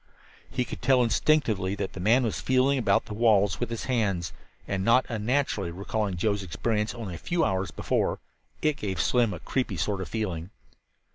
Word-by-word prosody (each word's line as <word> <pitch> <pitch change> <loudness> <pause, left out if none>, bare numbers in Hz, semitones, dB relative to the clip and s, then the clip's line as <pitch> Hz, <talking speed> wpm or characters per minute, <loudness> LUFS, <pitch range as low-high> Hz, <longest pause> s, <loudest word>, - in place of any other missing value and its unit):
He 125 - -1
could - - -8
tell 130 -1 +4
instinctively 115 -7 +2
that 100 -2 -4
the - - -7
man 115 +8 +4
was 115 - -2
feeling 130 +1 +2
about 100 -5 +2
the - - -7
walls 105 -4 +3
with 120 - -2
his 115 -1 -4
hands. 100 -10 0 0.3
And 95 -1 -1
not 115 +5 +4
unnaturally, 115 -3 0
recalling 100 +2 -2
Joe's 100 +2 0
experience 105 +4 -2
only 110 -6 -6
a - - -5
few 170 -2 0
hours 95 0 -1
before, - - -1 0.4
it 155 -2 +2
gave 95 -3 -3
Slim 120 -4 +2
a - - -5
creepy 130 -2 -2
sort 100 -2 -1
of 95 - -6
feeling. 95 -6 -3
110 Hz, 185 wpm, -27 LUFS, 95-125 Hz, 0.4 s, tell